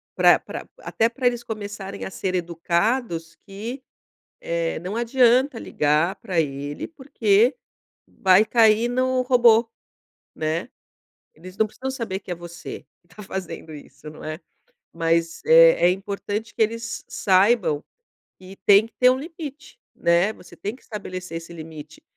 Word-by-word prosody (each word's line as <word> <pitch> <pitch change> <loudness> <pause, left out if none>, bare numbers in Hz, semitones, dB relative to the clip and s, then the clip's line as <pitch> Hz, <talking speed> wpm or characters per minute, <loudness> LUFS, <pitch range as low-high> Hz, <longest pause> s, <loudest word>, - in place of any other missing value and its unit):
Pra - - +6
pra - - -8
até 225 +1 0
pra 255 +2 -6
eles 240 -1 +2
começarem 205 -3 -6
a - - -6
ser 185 -1 -3
educados 170 +1 -1
que, 225 +7 -6 0.6
eh, 170 -1 -2
não 185 +6 -5
adianta 245 +1 +3
ligar 150 +5 +1
pra 180 -3 -2
ele 145 -1 -3
porque 245 -5 +2 0.5
vai 190 +3 +4
cair 225 0 +4
no 255 +1 +1
robô, 240 -2 +5 0.7
né. 160 +5 -2 0.7
Eles 185 +1 -12
não 220 - +3
precisam 260 +5 -6
saber 225 -7 -4
que 190 - -12
é 175 - -1
você 175 0 -9 0.2
que 175 - -36
está 210 - -11
fazendo 185 -4 -6
isso, 145 +1 -12
não 155 - -12
é? 155 0 -5 0.5
Mas 165 0 0
é - - +7
é - - +6
importante 205 +3 -4
que - - +1
eles 230 +1 -2
saibam 190 -5 +2 0.6
que 190 +1 -12
tem 205 +2 +7
que - - -29
ter 250 0 +7
um 255 - +2
limite, 305 - -9 0.2
né, 170 +4 +2
você 180 - -15
tem 205 +4 -5
que - - -22
estabelecer 185 -5 -6
esse 165 +1 -10
limite. 155 -2 -10
200 Hz, 150 wpm, -23 LUFS, 170-235 Hz, 0.7 s, é